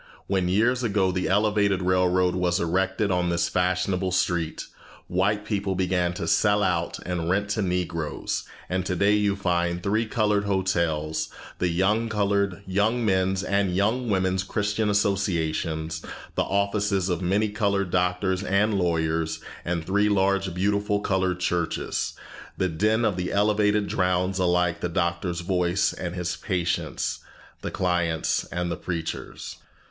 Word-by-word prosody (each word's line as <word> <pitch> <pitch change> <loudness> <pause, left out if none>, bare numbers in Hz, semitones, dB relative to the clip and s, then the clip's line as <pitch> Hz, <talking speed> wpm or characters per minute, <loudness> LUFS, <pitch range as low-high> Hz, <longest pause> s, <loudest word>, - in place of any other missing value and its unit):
When 95 -2 0
years 115 +6 +2
ago 100 -5 +1
the 90 0 -1
elevated 100 -1 +2
railroad 90 0 +2
was 90 -1 +1
erected 95 +4 0
on 90 -1 +1
this 85 0 +1
fashionable 90 +1 0
street, 85 -3 0 0.4
white 100 +3 0
people 100 -3 -1
began 90 -1 +1
to 85 - -3
sell 105 +4 +3
out - - 0
and 85 -2 -2
rent 100 +3 +1
to 105 +2 0
Negroes; 90 -4 -2 0.2
and 95 0 -1
today 95 +3 +2
you 105 -1 +2
find 85 -3 0
here 90 - -7
three 110 +3 +1
colored 105 -3 +1
hotels, 80 -5 0 0.3
the 95 +6 +1
colored 100 -2 0
Young 110 +5 +1
Men's 95 -1 +1
and 100 -3 +1
Young 110 +6 +1
Women's 95 -1 +1
Christian 105 +2 -1
Associations, 85 -6 0 0.3
the - - 0
offices 100 -1 0
of 90 -2 -1
many 100 +4 +1
colored 100 -3 0
doctors 90 +1 +1
and 100 +1 +2
lawyers, 80 -2 0 0.2
and 85 -2 -2
three 100 +3 +2
large 100 -1 +2
beautiful 100 +2 +1
colored 95 -2 0
churches. 90 -2 -1 0.4
The 95 - +1
din 110 +7 +1
of 100 -4 +1
the 90 0 -2
elevated 105 0 +2
drowns 90 0 0
alike 90 -1 +2
the 90 - -1
doctor's 85 0 -1
voice 90 +1 +1
and 90 0 -5
his 90 -1 -2
patient's, 90 -4 -2 0.4
the - - -3
client's 85 -3 0
and 90 0 -3
the 85 - -2
preacher's. 85 -3 -5
95 Hz, 140 wpm, -25 LUFS, 90-100 Hz, 0.4 s, sell